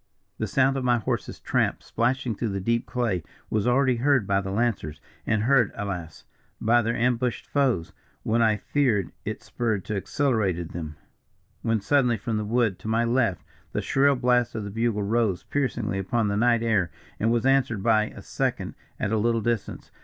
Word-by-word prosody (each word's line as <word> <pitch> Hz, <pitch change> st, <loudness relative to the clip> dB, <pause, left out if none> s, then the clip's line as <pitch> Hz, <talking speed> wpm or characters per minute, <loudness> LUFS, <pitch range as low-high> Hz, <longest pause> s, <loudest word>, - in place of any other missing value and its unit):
"The 110 Hz, -, -1 dB
sound 135 Hz, +5 st, +2 dB
of 135 Hz, -, -2 dB
my 120 Hz, -1 st, +3 dB
horse's 115 Hz, -, -3 dB
tramp, -, -, 0 dB
splashing 125 Hz, 0 st, 0 dB
through 110 Hz, +2 st, -2 dB
the 100 Hz, -1 st, -2 dB
deep 115 Hz, +4 st, 0 dB
clay, 120 Hz, -8 st, -1 dB, 0.3 s
was 110 Hz, +2 st, +1 dB
already 130 Hz, 0 st, +3 dB
heard 130 Hz, -2 st, +3 dB
by 100 Hz, 0 st, +1 dB
the 95 Hz, -, -5 dB
lancers, 100 Hz, -8 st, -1 dB, 0.3 s
and 110 Hz, -1 st, +1 dB
heard, 125 Hz, -3 st, +4 dB
alas! 90 Hz, -6 st, -5 dB, 0.3 s
by 120 Hz, +2 st, +4 dB
their 115 Hz, +1 st, -1 dB
ambushed 125 Hz, 0 st, 0 dB
foes, 125 Hz, -, 0 dB, 0.3 s
when 115 Hz, +2 st, +1 dB
I 110 Hz, -2 st, +3 dB
fear 115 Hz, -8 st, 0 dB
it -, -, -4 dB
spurred 110 Hz, -5 st, -2 dB
to 110 Hz, -, -3 dB
accelerated 100 Hz, -, 0 dB
action; 80 Hz, -3 st, -6 dB, 0.7 s
when 115 Hz, -2 st, 0 dB
suddenly 125 Hz, +1 st, +2 dB
from 110 Hz, +2 st, -2 dB
the 105 Hz, -, -2 dB
wood 110 Hz, -4 st, +1 dB
to 100 Hz, -, -9 dB
my 115 Hz, +1 st, +2 dB
left, 115 Hz, -, +1 dB, 0.3 s
the -, -, 0 dB
shrill 140 Hz, +1 st, +3 dB
blast 125 Hz, -2 st, +2 dB
of 110 Hz, -, -3 dB
the 100 Hz, -, -6 dB
bugle 115 Hz, -1 st, 0 dB
rose 105 Hz, -3 st, 0 dB
piercingly 120 Hz, -8 st, -1 dB
upon 105 Hz, +3 st, 0 dB
the 100 Hz, -, 0 dB
night 115 Hz, +1 st, +3 dB
air, 105 Hz, -7 st, +2 dB, 0.3 s
and 115 Hz, +2 st, +2 dB
was 120 Hz, +1 st, +1 dB
answered 130 Hz, -7 st, +2 dB
by 110 Hz, -1 st, +4 dB
a -, -, -10 dB
second -, -, -2 dB, 0.3 s
at 105 Hz, -, -1 dB
a 110 Hz, -, +2 dB
little 115 Hz, +1 st, +2 dB
distance. 115 Hz, -2 st, -3 dB
115 Hz, 185 wpm, -25 LUFS, 100-125 Hz, 0.7 s, heard